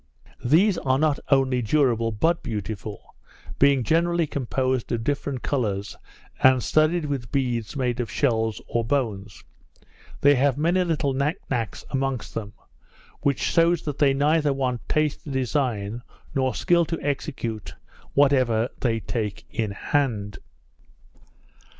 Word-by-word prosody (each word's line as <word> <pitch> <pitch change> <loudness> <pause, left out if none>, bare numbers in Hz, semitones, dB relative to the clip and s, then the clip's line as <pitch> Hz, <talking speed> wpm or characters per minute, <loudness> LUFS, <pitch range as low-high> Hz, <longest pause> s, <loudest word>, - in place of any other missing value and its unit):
These 170 - +4
are 130 -1 +1
not 150 0 +1
only 135 -2 +3
durable 115 -2 +2
but 165 +11 +1
beautiful; 105 -2 -6 0.5
being 140 -2 +4
generally 170 +3 +2
composed 130 -2 -1
of 115 -2 -1
different 140 -1 -2
colours, 105 -7 -2 0.5
and 130 -1 +5
studded 155 +2 +2
with 135 -5 -4
beads 125 -3 -1
made 125 -3 -1
of 120 - -2
shells 110 -5 0
or 115 - 0
bones. 110 -6 -2 0.8
They 145 +1 +6
have 140 0 +2
many 175 +5 +2
little 155 -5 0
nick 140 +5 0
nacks 115 -6 -2
amongst 135 -3 -2
them; 105 -2 -5 0.7
which 140 -2 0
shews 170 0 +2
that 145 -3 -4
they 140 -2 +4
neither 150 +1 +2
want 130 -3 -2
taste 155 -1 0
to - - -7
design, 125 -5 -1 0.3
nor 130 -1 0
skill 170 -1 +3
to 165 0 -3
execute, 120 - -3 0.4
whatever 130 -5 +3
they 115 -3 0
take 105 -1 -4
in 110 -2 -1
hand. 105 -3 -1
130 Hz, 130 wpm, -24 LUFS, 115-145 Hz, 0.8 s, They